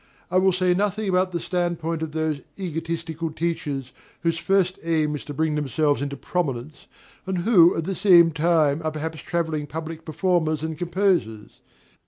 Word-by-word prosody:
I 185 - +4
will 190 0 +4
say 180 0 +2
nothing 205 +2 -1
about 185 0 +2
the 170 - -2
stand 175 0 -1
point 165 0 -3
of 160 -1 -3
those 155 -2 -1 0.2
egotistical 165 -2 -4
teachers 150 -5 -3 0.3
whose 165 -1 +1
first 190 0 +1
aim 155 -2 0
is 145 - -6
to 145 - -6
bring 160 +1 +1
themselves 150 0 0
into 140 0 -3
prominence, 145 -4 -3 0.4
and 190 -1 -1
who 175 -2 +5
at 165 - -1
the 195 - -2
same 175 -3 +6
time 155 -2 +2
are 155 - 0
perhaps 160 +1 -5
travelling 160 -4 -2
public 160 +1 -6
performers 160 -2 0
and 160 0 -3
composers. 175 - -1
165 Hz, 170 wpm, -24 LUFS, 155-180 Hz, 0.4 s, same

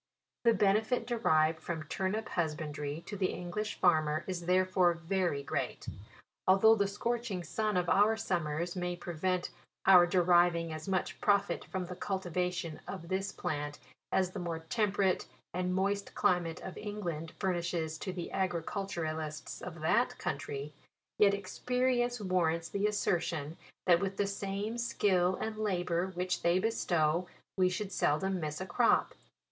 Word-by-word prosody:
The 230 -1 +6
benefit 215 +4 +2
derived 160 -10 +2
from 160 -1 -4
turnip 190 +7 -2
husbandry 150 -2 -3
to 210 - -6
the 190 -2 +1
English 180 +5 -4
farmer 155 -2 +2
is 175 -2 -4
therefore 185 -1 +3
very 170 -4 -1
great. 140 - -3 0.6
Although 195 +4 +7
the 200 -3 +2
scorching 230 -2 -2
sun 210 +4 -1
of 180 -1 +1
our 210 +5 +4
sum 175 -7 -1
mers 165 +4 -2
may 180 -1 -2
prevent 175 +1 -2 0.3
our 180 -2 +8
deriving 175 -2 +3
as 155 +2 -7
much 190 -1 -1
profit 200 -1 +2
from 190 -2 -3
the 180 +1 -7
cultivation 180 -4 -2
of 170 - -7
this 190 +1 -1
plant 150 -4 -3 0.3
as 185 -1 +2
the 195 - -5
more 170 -2 -3
temperate 195 +2 0 0.3
and 180 +1 -1
moist 200 +1 -1
climate 175 -2 +1
of 190 - -7
England 175 -7 -4
fur 190 -2 +1
nishes 170 -2 -2
to 190 - -3
the 180 -2 -5
agriculturists 165 -4 -3
of 170 -3 -7
that 220 +10 +2
country, 140 +1 -4 0.5
yet 200 -1 +6
experience 245 +4 0
warrants 170 -4 0
the 200 +1 +1
assertion, 170 -7 -1 0.3
that 175 -2 +6
with 195 0 -2
the 205 - +2
same 200 +3 -3
skill 185 -6 +2
and 220 +2 -4
labour 180 -4 0
which 180 0 -1
they 170 +1 +3
bestow, 175 -5 +1 0.3
we 185 -1 +3
should 195 +2 -3
seldom 190 +4 +1
miss 155 -2 -3
a 190 - -3
crop. 230 +6 +3
180 Hz, 150 wpm, -32 LUFS, 170-200 Hz, 0.6 s, our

